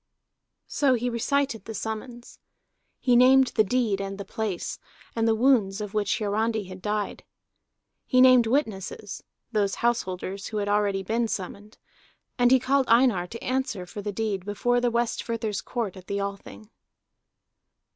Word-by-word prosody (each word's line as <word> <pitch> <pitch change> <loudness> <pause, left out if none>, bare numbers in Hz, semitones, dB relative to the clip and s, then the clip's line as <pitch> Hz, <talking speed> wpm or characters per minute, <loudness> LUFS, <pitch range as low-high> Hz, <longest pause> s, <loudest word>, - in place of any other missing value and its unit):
So 275 -3 +2
he 245 +1 -2
recited 255 0 -1
the 225 - -7
summons. 235 +4 -6 0.6
He 250 -2 +3
named 260 +1 +6
the 215 - +4
deed 215 -2 0
and 195 0 -5
the 200 - -7
place, 205 -3 -4 0.4
and 225 0 +1
the 225 - +3
wounds 220 -5 +3
of 210 -1 -5
which 210 -1 0
Hiarandi 220 +1 0
had 185 0 -10
died. 210 0 -3 0.8
He 255 - +3
named 255 -2 +7
witnesses, 215 -5 -2 0.3
those 205 -3 +1
householders 195 -4 -2
who 215 - -4
had 205 -1 -1
already 205 -1 +1
been 230 +4 0
summoned. 205 +1 -6 0.6
And 245 0 +5
he 260 - +6
called 265 +1 +1
Einar 230 -7 +4
to 230 +6 -9
answer 255 -7 -2
for 205 +3 -8
the 205 +1 -3
deed 205 -3 -2
before 245 +5 0
the 245 - +2
Westfirther's 230 -2 -2
Court 230 -7 -4
at 185 -1 -13
the 200 0 -2
Althing. 200 +2 -7
220 Hz, 155 wpm, -26 LUFS, 200-245 Hz, 0.8 s, named